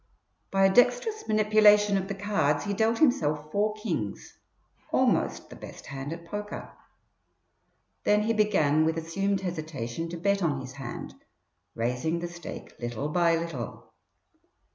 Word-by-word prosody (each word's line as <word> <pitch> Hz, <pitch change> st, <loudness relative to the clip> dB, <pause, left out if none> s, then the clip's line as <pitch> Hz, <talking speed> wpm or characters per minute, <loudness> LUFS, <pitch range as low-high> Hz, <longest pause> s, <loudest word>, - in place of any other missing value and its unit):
By 195 Hz, 0 st, +3 dB
a 195 Hz, -, +4 dB
dexterous 245 Hz, -, +3 dB
manipulation 210 Hz, -1 st, +5 dB
of 195 Hz, -1 st, -1 dB
the 200 Hz, -, -4 dB
cards 195 Hz, -8 st, +1 dB
he 205 Hz, -, -1 dB
dealt 225 Hz, +3 st, +2 dB
himself 155 Hz, -, +2 dB
four 210 Hz, +3 st, +1 dB
kings, 165 Hz, -, -4 dB, 0.6 s
almost -, -, +1 dB
the -, -, -8 dB
best -, -, -11 dB
hand 135 Hz, +1 st, -6 dB
at 170 Hz, 0 st, -7 dB
poker. 205 Hz, +4 st, -6 dB, 1.3 s
Then 210 Hz, 0 st, +3 dB
he 230 Hz, +1 st, +1 dB
began 155 Hz, -9 st, +3 dB
with 160 Hz, +1 st, +1 dB
assumed 195 Hz, +4 st, -1 dB
hesitation 155 Hz, -5 st, -4 dB
to 170 Hz, -, -5 dB
bet 200 Hz, +3 st, +1 dB
on 150 Hz, -6 st, +1 dB
his 130 Hz, -1 st, -7 dB
hand, 135 Hz, -3 st, -7 dB, 0.6 s
raising 125 Hz, +8 st, -1 dB
the 175 Hz, +1 st, -3 dB
stake 170 Hz, -1 st, -9 dB
little 120 Hz, +4 st, -3 dB
by 170 Hz, +1 st, +3 dB
little. 165 Hz, -8 st, -6 dB
175 Hz, 140 wpm, -28 LUFS, 150-210 Hz, 1.3 s, manipulation